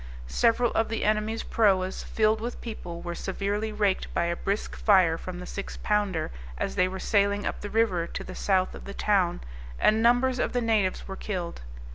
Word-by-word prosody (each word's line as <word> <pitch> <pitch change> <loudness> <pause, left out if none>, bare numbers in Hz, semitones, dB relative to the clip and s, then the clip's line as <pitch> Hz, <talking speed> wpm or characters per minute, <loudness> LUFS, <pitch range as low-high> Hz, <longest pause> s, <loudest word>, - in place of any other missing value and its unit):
Several 230 - +2
of 225 - +1
the 225 - -2
enemy's 215 +1 0
proas, 190 -4 +2
filled 215 0 +1
with 240 +2 -4
people, 175 -7 -7
were 175 - -4
severely 200 +4 -2
raked 205 -3 0
by 170 - +2
a 170 0 0
brisk 200 +4 -2
fire 185 -6 +4
from 175 +2 -7
the 180 - -7
six 200 +2 -6
pounder, 205 -6 0 0.3
as - - -2
they 180 - +3
were 190 +1 -5
sailing 205 0 +2
up - - -3
the 205 - -5
river 200 -7 +1
to - - -5
the 185 - -8
south 185 -1 +1
of - - -10
the 200 - -7
town, 190 -4 +1 0.4
and 215 - +3
numbers 245 +2 +3
of - - 0
the 245 - +1
natives 215 -5 +1
were 195 - -5
killed. 180 - -4
200 Hz, 195 wpm, -27 LUFS, 185-220 Hz, 0.4 s, fire